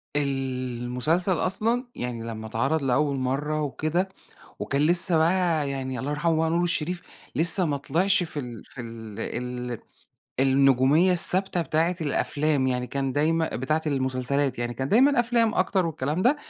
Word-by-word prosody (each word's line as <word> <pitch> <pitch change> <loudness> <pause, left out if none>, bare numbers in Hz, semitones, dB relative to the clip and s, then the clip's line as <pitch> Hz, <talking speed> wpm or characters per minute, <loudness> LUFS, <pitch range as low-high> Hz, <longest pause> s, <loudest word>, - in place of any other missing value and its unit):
المسلسل 130 +4 -1
أصلًا 220 +8 0
يعني 120 -2 -5
لما 110 -1 -6
اتعرض 135 +8 -1
لأول 140 +2 +1
مرة 140 +4 -1
وكده، 155 +6 -1 0.5
وكان 140 +1 -1
لسه 175 +2 +4
بقى 165 -3 +1
يعني- 130 -2 -4
الله 135 +4 -3
يرحمه- 160 +2 0
بقى 160 0 +1
نور 170 +2 +1
الشريف 175 0 -2 0.3
لسه 175 +3 +5
ماطلْعش 165 +6 +1
في 160 -3 -5
ال 120 -5 -8
في 130 - -10
ال 115 -3 -9 0.5
ال 120 - -5 0.6
النجومية 135 +5 +4
الثابتة 180 +1 +4
بتاعة 165 +4 0
الأفلام، 145 -1 0
يعني 125 -1 -1
كان 135 0 -2
دايمًا 160 +3 0
بتاعة 155 +4 -1
المسلسلات 135 -1 -1
يعني، 120 0 -3
كان 130 +2 -3
دايمًا 260 - +4
أفلام 235 -2 +1
أكتر 185 -1 +1
والكلام 155 +2 -2
ده، 260 +7 +3
150 Hz, 145 wpm, -25 LUFS, 130-175 Hz, 0.6 s, لسه